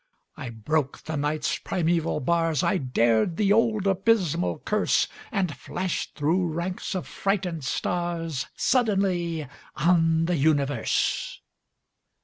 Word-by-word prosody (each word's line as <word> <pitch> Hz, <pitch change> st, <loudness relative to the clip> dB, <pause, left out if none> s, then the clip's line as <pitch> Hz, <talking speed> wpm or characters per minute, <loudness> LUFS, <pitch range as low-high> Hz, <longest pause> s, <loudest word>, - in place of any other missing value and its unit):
I 140 Hz, -7 st, -6 dB
broke 135 Hz, +5 st, -2 dB
the 160 Hz, -, -4 dB
Night's 150 Hz, +1 st, -1 dB
primeval 165 Hz, -3 st, 0 dB
bars, 165 Hz, 0 st, +1 dB
I 190 Hz, -, +2 dB
dared 120 Hz, +2 st, +2 dB
the 205 Hz, -2 st, +3 dB
old 220 Hz, -2 st, +2 dB
abysmal 190 Hz, -, +1 dB
curse, -, -, +1 dB, 0.2 s
And 180 Hz, -6 st, -1 dB
flashed 185 Hz, -1 st, -4 dB
through 165 Hz, +4 st, +1 dB
ranks 180 Hz, +3 st, -3 dB
of 185 Hz, -, -3 dB
frightened 185 Hz, -6 st, -2 dB
stars 165 Hz, -1 st, -2 dB
Suddenly 190 Hz, -, +1 dB, 0.3 s
on 165 Hz, 0 st, +3 dB
the 175 Hz, 0 st, 0 dB
universe! 140 Hz, -4 st, +1 dB
165 Hz, 115 wpm, -26 LUFS, 150-185 Hz, 0.3 s, the